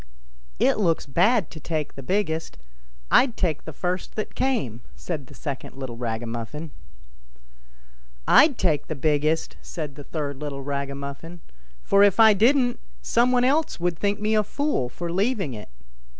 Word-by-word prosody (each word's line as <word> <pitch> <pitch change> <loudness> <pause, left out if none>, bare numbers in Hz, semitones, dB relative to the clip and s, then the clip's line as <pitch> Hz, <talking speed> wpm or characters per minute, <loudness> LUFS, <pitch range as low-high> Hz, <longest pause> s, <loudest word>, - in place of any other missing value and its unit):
" - - -30
It - - +3
looks 170 -5 +1
bad 195 - +2
to 160 - -9
take 155 -1 -3
the 135 - -9
biggest; 165 0 -1 0.5
I'd 250 -3 +4
take 165 -5 -1
the 160 - -6
first 180 +3 -3
that 215 - -4
came," 135 - -1
said 150 -7 -5
the - - -14
second 140 -4 -6
little 130 -3 -6
ragamuffin. 120 +5 -4 0.8
" - - -30 0.7
I'd 285 -5 +6
take 155 -6 +1
the 155 - -3
biggest! 155 +2 0
" - - -27
said 155 -5 -6
the 145 0 -10
third 145 -2 -4
little 140 -1 -5
raga 140 0 -3
muffin; 140 +5 -8 0.2
" - - -30
for 200 - +4
if 205 +1 +5
I 220 -1 +8
didn't, 245 +4 +3 0.2
some 240 - +3
one 250 -1 +3
else 290 - +1
would 175 -1 -1
think 205 0 0
me 215 +1 0
a 215 - +4
fool 245 - -1
for 170 +5 -5
leaving 195 - 0
it." 105 - -9
160 Hz, 175 wpm, -24 LUFS, 140-205 Hz, 0.8 s, I